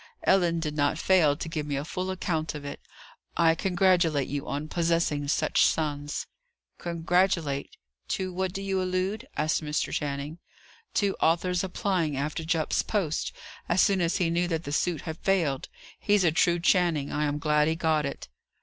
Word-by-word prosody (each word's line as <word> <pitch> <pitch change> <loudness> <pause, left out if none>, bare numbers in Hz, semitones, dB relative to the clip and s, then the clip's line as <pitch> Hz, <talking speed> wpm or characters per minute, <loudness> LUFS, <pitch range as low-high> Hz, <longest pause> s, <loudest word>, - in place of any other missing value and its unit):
"Ellen 175 -3 +3
did 150 -2 -3
not 145 +1 +1
fail 165 -6 +3
to 165 - -5
give 155 -2 -3
me 145 - -2
a 140 +2 -3
full 185 +3 -3
account 165 -4 -2
of 145 -1 -7
it. 140 - -7 0.6
I 165 -1 +5
congratulate 175 -5 +2
you 140 0 -4
on 145 +2 -3
possessing 165 -3 0
such 155 +1 +2
sons." 145 -2 -1 0.5
"Congratulate! 170 -3 0 0.3
To 185 -1 -2
what 190 0 -1
do 195 +2 -5
you 190 -1 0
allude?" 185 +6 -2
asked 155 +2 +1
Mr. 150 0 -1
Channing. 145 +2 -3 0.6
"To 200 -2 +2
Arthur's 175 +2 +2
applying 180 -6 -1
after 150 +3 -2
Jupp's 160 -1 +1
post, 185 -8 -1 0.4
as 175 - +2
soon 195 -1 +4
as 170 0 +1
he 175 -4 +1
knew 175 +1 +1
that 165 -2 -2
the 145 - -5
suit 165 +2 0
had 160 0 -6
failed. 165 -9 0 0.3
He's 205 -2 +3
a 170 - +4
true 170 +2 +2
Channing. 170 -5 +2
I 150 +1 0
am 145 0 -1
glad 150 0 +2
he 160 - +1
got 160 -2 +1
it." 140 - -5
165 Hz, 175 wpm, -27 LUFS, 150-180 Hz, 0.6 s, I